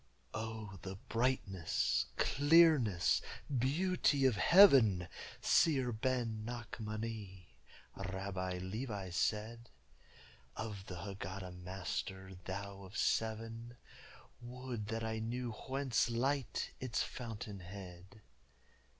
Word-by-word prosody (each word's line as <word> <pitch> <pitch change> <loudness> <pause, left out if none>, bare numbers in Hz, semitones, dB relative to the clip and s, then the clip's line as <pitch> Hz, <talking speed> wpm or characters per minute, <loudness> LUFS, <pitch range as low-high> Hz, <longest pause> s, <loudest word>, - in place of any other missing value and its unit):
"O 110 -3 -5
the 95 0 -6
brightness, 115 -5 0
clearness, 145 - +5 0.3
beauty 145 +2 +2
of 130 -4 +4
heaven! 120 - +7 0.3
Seer 135 -6 +4
Ben 115 -2 -1
Nachmani," 110 - -5 0.5
Rabbi 95 -1 -3
Levi 100 0 -4
said, 110 +6 -1 0.9
"Of 105 -3 -5
the 90 -1 -6
Hagada 95 -1 -6
Master 95 +1 -5
thou 100 +1 -5
of 95 +3 -9
seven, 115 +2 -1 0.6
Would 120 -3 -5
that 115 +1 -2
I 110 0 -2
knew 120 +2 -3
whence 130 +1 0
Light, 130 +1 0
its 125 -4 0
fountainhead?" 100 -4 -8
110 Hz, 90 wpm, -36 LUFS, 95-125 Hz, 0.9 s, heaven